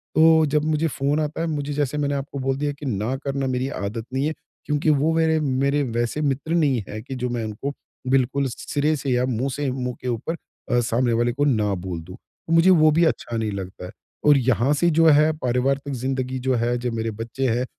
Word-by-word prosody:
तो, 160 0 +6
जब 150 0 +1
मुझे 155 +1 +1
फ़ोन 145 0 0
आता 155 +1 -2
है, 165 - -1
मुझे 145 -2 -2
जैसे 145 0 -1
मैंने 145 -1 0
आपको 140 0 -5
बोल 135 0 -1
दिया 145 +1 -1
कि 150 - -7
ना 115 0 -1
करना 135 -1 -2
मेरी 130 0 -1
आदत 110 -1 -4
नहीं 135 +2 0
है, 155 - -1 0.3
क्योंकि 150 +1 +1
वो 150 +2 +3
वेरे 160 -1 +3
मेरे 140 0 +1
वैसे 120 +3 -2
मित्र 145 +2 -1
नहीं 145 -8 +2
है 110 +1 -5
कि 130 +3 -7
जो 125 0 -2
मैं 120 -1 -2
उनको 110 +6 -4 0.4
बिल्कुल 135 +1 +2
सिरे 145 +5 -1
से 140 -1 -4
या 125 0 +2
मुँह 130 +1 -1
से 145 -1 -1
मुँह 125 -1 -3
के - - -5
ऊपर 125 +7 -2 0.4
अ, 120 - +4
सामने 120 +1 +1
वाले 120 +1 +2
को 145 +3 0
ना 110 -7 +2
बोल 85 -3 -4
दूँ। 90 +4 -11 0.3
मुझे 165 +2 +5
वो 155 -4 +6
भी 165 +3 +4
अच्छा 120 -7 -1
नहीं 110 -1 -1
लगता 95 -2 -6
है। 90 - -8 0.3
और 150 -1 +7
यहाँ 130 +1 +2
से 170 +4 +2
जो 165 0 +3
है, 155 0 +6
पारिवारिक 135 +2 0
ज़िंदगी 130 0 -2
जो 130 0 0
है, 120 +1 0
जो 120 0 -3
मेरे 115 0 -2
बच्चे 115 +5 -3
हैं, 120 +2 0
135 Hz, 225 wpm, -23 LUFS, 120-150 Hz, 0.4 s, और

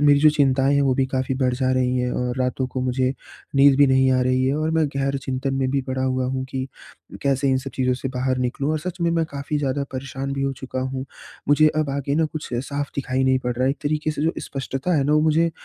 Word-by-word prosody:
मेरी 145 -1 +5
जो 155 0 +7
चिंताएँ 135 -1 +2
हैं 140 - +3
वो 130 -2 +2
भी 135 - +2
काफ़ी 130 0 -1
बढ़ 125 -1 +2
जा 130 0 0
रही 130 0 +1
हैं 125 0 0
और 125 0 -2
रातों 130 +1 0
को 130 - -4
मुझे 130 +1 +1 0.4
नींद 140 -1 +6
भी 145 - +7
नहीं 130 0 +4
आ 130 - +3
रही 130 0 +2
है 135 - +1
और 155 +1 0
मैं 160 -1 +2
गहन 140 0 0
चिंतन 135 +1 -2
में 130 -1 0
भी 140 0 +1
पड़ा 130 0 -3
हुआ 130 0 0
हूँ 130 0 -2
कि 130 0 -3 0.6
कैसे 140 0 +1
इन 130 - +3
सब 135 +1 -6
चीज़ों 130 -1 +1
से 130 +1 -4
बाहर 130 0 0
निकलूँ। 135 +4 -1
और 155 - 0
सच 180 +3 -6
में 170 0 +2
मैं 165 -1 +1
काफ़ी 140 +1 -3
ज़्यादा 140 0 -1
परेशान 135 +1 -4
भी 135 0 -2
हो 135 0 0
चुका 130 0 -5
हूँ। 130 0 -3 0.4
मुझे 155 +1 +6
अब 155 -3 0
आगे 140 0 -2
ना 160 +1 +2
कुछ 155 0 -7
साफ़ 140 +3 -3
दिखाई 130 -1 0
नहीं 130 0 +3
पड़ 125 -1 -1
रहा 130 - +1
है। 135 - +3
एक 140 - -4
तरीके 155 +1 0
से 150 - -3
जो 165 +2 +2
स्पष्टता 135 +5 -3
है 140 - +2
ना 150 - +2
वो 150 - +4
मुझे 160 +2 +3
135 Hz, 265 wpm, -23 LUFS, 130-145 Hz, 0.6 s, जो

